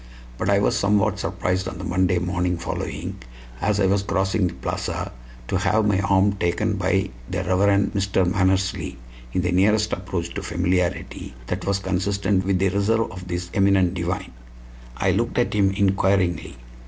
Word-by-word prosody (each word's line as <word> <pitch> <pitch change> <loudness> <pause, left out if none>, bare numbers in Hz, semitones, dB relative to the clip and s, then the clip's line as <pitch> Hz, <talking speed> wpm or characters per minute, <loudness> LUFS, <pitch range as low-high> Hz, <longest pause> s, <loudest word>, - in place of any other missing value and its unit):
But 95 - 0
I 100 - +4
was 100 - +2
somewhat 105 0 +2
surprised 90 0 -1
on 90 - -6
the 90 - -7
Monday 90 0 +1
morning 90 0 -1
following, - - -4 0.4
as 105 +1 +1
I 100 - +3
was 95 +1 +2
crossing 95 0 +1
the - - -6
plaza, - - -3 0.4
to - - 0
have 110 0 +2
my 100 -2 +2
arm 100 0 +3
taken 85 +1 0
by 95 0 0 0.2
the 90 -1 -2
Rev. 100 +2 +2
Mr. 95 -2 +1
Mannersley 95 -6 0 0.3
in 90 - 0
the 90 - 0
nearest 105 +4 +3
approach 90 -2 -3
to 100 - -4
familiarity 90 -3 -1
that - - -4
was 100 -1 +2
consistent 95 0 0
with 95 -1 +2
the 95 +1 +2
reserve 105 +4 +1
of 90 -1 -9
this 90 0 -4
eminent 95 -2 +3
divine. 90 +1 -3 0.7
I - - +2
looked - - -1
at - - +1
him 100 -2 +3
inquiringly. 95 -4 +1
95 Hz, 165 wpm, -23 LUFS, 90-100 Hz, 0.7 s, I